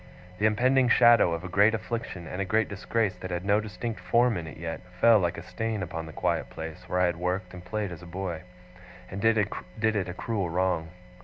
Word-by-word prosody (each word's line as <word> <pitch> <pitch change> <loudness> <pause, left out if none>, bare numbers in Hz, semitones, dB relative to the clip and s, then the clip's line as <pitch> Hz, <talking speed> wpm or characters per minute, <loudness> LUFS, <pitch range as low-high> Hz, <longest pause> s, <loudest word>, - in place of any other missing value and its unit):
The 105 - +4
impending 125 +4 +3
shadow 120 -6 +6
of 85 +1 -3
a - - -4
great 100 +4 +4
affliction, 110 -5 -5
and 90 +4 -4
a - - +2
great 110 +3 +1
disgrace 100 0 -1
that 95 - -7
had 90 +1 -3
no 100 +1 +4
distinct 110 +2 -5
form 120 -1 +3
in 85 -3 -4
it 75 - -9
yet, 80 0 -5 0.2
fell 115 0 +7
like 85 -2 -1
a 85 - -7
stain 110 0 -3
upon 80 -2 -5
the - - -8
quiet - - -1
place 80 0 -8
where 90 - 0
I - - +5
had 85 -1 0
worked 90 +1 -2
and 90 -1 -9
played 105 +1 -3
as 85 - -8
a 90 - -11
boy, 90 -2 -4 0.7
and 95 +1 -5
did 115 +1 +4
it 105 0 -2
a - - -4
cruel 100 -4 -2
wrong. 90 -2 0
95 Hz, 225 wpm, -27 LUFS, 90-110 Hz, 0.7 s, fell